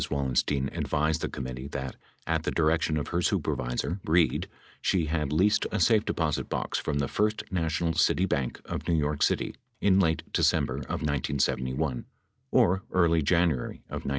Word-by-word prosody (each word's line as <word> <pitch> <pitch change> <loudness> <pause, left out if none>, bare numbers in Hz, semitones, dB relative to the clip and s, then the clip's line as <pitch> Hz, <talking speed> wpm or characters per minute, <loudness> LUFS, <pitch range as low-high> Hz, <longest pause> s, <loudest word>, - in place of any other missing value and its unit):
Wallen 70 -3 -1
stein 70 0 +1
advised 75 +2 0
the - - -2
committee 65 0 -6
that, 65 -2 -5 0.3
at - - 0
the - - -2
direction 80 -1 +1
of 75 - -3
her 85 +1 0
supervisor, 70 +3 -1
Reid, 85 +1 +2 0.3
she 90 -4 +1
had 75 -2 -1
leased 95 +7 +3
a 105 - -1
safe 105 +4 +4
deposit 75 -4 -1
box - - -2
from 75 -2 -2
the 70 -2 0
First 105 +6 0
National 80 -1 0
City 90 - +3
Bank 70 -9 -2
of - - -5
New 85 - +2
York 75 -1 0
City - - +1 0.3
in 95 -1 +4
late 80 -4 +2
December - - +2
of - - -4
1971 65 -1 -1 0.5
or 95 +2 +4
early 85 -3 +3
January 80 -3 +1 0.2
of - - -5
1972. - - -1
80 Hz, 170 wpm, -28 LUFS, 70-85 Hz, 0.5 s, safe